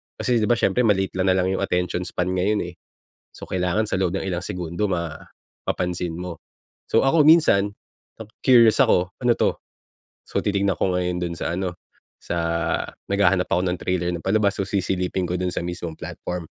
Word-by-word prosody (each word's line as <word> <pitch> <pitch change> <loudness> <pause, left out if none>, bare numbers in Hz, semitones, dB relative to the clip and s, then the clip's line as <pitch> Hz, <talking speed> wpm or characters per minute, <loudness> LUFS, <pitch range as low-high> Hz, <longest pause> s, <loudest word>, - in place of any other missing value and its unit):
kasi 125 -2 +1
‘di 105 - +1
ba 120 - +3
siyempre, 125 +2 +2
maliit 95 -3 +2
na 95 - +1
lang 95 0 +1
‘yong 95 - -1
attention 90 0 -1
span 90 +1 -2
ngayon, 100 +3 +1
eh. 85 - -12 0.6
So - - -11
kailangan 90 +4 0
sa - - 0
loob 90 -2 0
ng - - -1
ilang 90 -1 -3
segundo, 90 +3 -3
mapapansin 85 +1 -4
mo. 90 -2 -5 0.5
So 115 - +4
ako 150 +1 +4
minsan, 150 -11 +5 0.5
naku-curious 115 +1 +4
ako, 90 0 +2 0.2
"Ano 120 - +5
‘to?" - - +2 0.7
So - - -2
titignan 100 -2 +1
ko 95 - 0
ngayon 90 -1 -1
doon 85 -1 -3
sa 85 - -2
ano, 90 -2 -3 0.4
sa 85 - -4 0.7
naghahanap 95 -2 +3
ako 90 - +2
ng 90 0 -1
trailer 90 -1 -1
ng 85 - -3
palabas, 100 +1 +1
so 95 - -1
sisilipin 95 -1 -1
ko 90 - -2
doon 90 -1 -1
sa - - -2
mismong 85 -2 -5
platform. 90 -1 -6
90 Hz, 180 wpm, -23 LUFS, 90-100 Hz, 0.7 s, minsan